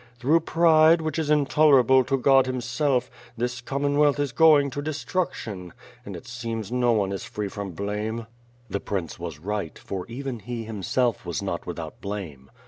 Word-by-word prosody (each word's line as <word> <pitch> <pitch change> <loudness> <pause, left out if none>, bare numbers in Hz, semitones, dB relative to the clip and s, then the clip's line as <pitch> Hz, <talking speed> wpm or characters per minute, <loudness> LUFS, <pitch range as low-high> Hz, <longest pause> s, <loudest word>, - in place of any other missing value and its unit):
Through 145 +7 +3
pride, 165 0 +5
which 155 +1 -2
is 155 -2 -2
intolerable 140 -3 +5
to 135 +2 +1
God 135 0 +4
himself, 125 +1 -1 0.3
this 120 +1 -2
Commonwealth 145 +2 +1
is 145 -2 0
going 150 -2 +5
to 145 - -4
destruction, 145 - -3 0.3
and - - -8
it - - -10
seems 115 -3 -5
no 125 -2 +2
on^ 100 0 -2
is 95 - -5
free 105 -1 -4
from 100 -2 -6
blame 105 +5 -3 0.2
" 120 0 -32
"The 100 - -1
prince 95 -7 -4
was 85 -3 -6
right; 95 0 -4
for 95 -2 -6
even 125 0 -5
he, 120 +1 -5
himself, 115 +3 -1
was - - -4
not - - -4
with - - -5
out - - -8
blame. 85 -10 -6
125 Hz, 175 wpm, -25 LUFS, 105-145 Hz, 0.3 s, pride